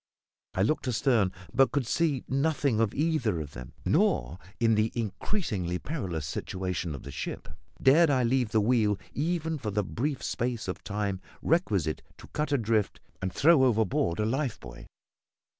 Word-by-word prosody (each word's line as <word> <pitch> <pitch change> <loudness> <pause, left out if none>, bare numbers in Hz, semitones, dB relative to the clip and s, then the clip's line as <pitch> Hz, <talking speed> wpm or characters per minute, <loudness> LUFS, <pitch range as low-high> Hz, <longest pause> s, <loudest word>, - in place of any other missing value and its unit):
I 95 - +2
looked 145 +5 0
astern, 115 -4 +2 0.2
but 135 -1 +4
could 140 -3 0
see 145 0 +1
nothing 135 -3 +1
of 115 -2 +2
either 140 - +1
of 75 -2 -6
them; 65 -2 -9
nor, 65 +9 +2 0.2
in 115 -1 +4
the 110 +1 +2
increasingly 105 - -2
perilous 90 - -4
situation 90 0 -3
of 70 - -9
the - - -8
ship, - - -5 0.3
dared 155 +5 +6
I 130 -3 +3
leave 125 -1 +2
the 110 0 +2
wheel 105 -2 +2 0.2
even 160 +1 -1
for 110 - -3
the 105 0 0
brief 135 +8 -2
space 120 -3 -2
of 95 - -5
time 100 -2 -2 0.2
requisite 100 - +1 0.2
to - - -12
cut 150 0 -2
adrift 115 -6 +1 0.2
and 95 0 -1
throw 155 - +5
overboard 110 -8 +2
a 105 - +2
life 130 +2 -1
buoy. - - -11
115 Hz, 160 wpm, -28 LUFS, 95-140 Hz, 0.3 s, dared